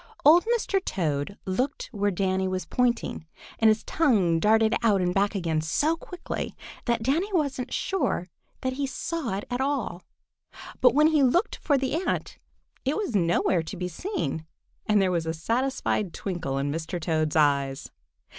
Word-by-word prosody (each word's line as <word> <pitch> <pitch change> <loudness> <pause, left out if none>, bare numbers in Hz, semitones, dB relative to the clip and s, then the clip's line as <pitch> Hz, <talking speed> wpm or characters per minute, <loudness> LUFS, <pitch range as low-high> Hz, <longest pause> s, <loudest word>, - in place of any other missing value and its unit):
Old 335 +6 +7
Mr. 390 -4 -1
Toad 155 0 -2
looked 255 +10 -2
where 205 -3 0
Danny 190 0 0
was 185 0 -2
pointing, 240 -9 -1 0.3
and 225 - +5
his 215 0 +3
tongue 205 - +2
darted 220 +4 +4
out 215 -4 +3
and 180 -1 +1
back 200 +2 +1
again 165 -4 0
so 290 - +1
quickly 360 +2 -6 0.3
that 235 -2 0
Danny 325 - +1
wasn't 280 -7 -1
sure 370 - -1 0.3
that 260 0 -1
he 275 +1 -2
saw 270 - -3
it 205 - -5
at 245 +1 -1
all, 265 -10 -1 0.8
but 250 - +5
when 305 +1 +6
he 310 -2 +3
looked 340 - +2
for 285 -3 +1
the 265 0 -1
ant - - -2 0.4
it 275 +6 0
was 405 - -2
nowhere 170 -1 +2
to 160 - -7
be 180 0 -2
seen, 180 - -4 0.4
and 210 -1 +4
there 190 -2 +2
was 170 -2 -1
a 160 - -1
satisfied 225 0 -1
twinkle 170 -8 -3
in 140 +1 -1
Mr. 165 +3 -3
Toad's 155 -2 0
eyes. 140 -3 +1
210 Hz, 165 wpm, -26 LUFS, 170-270 Hz, 0.8 s, Old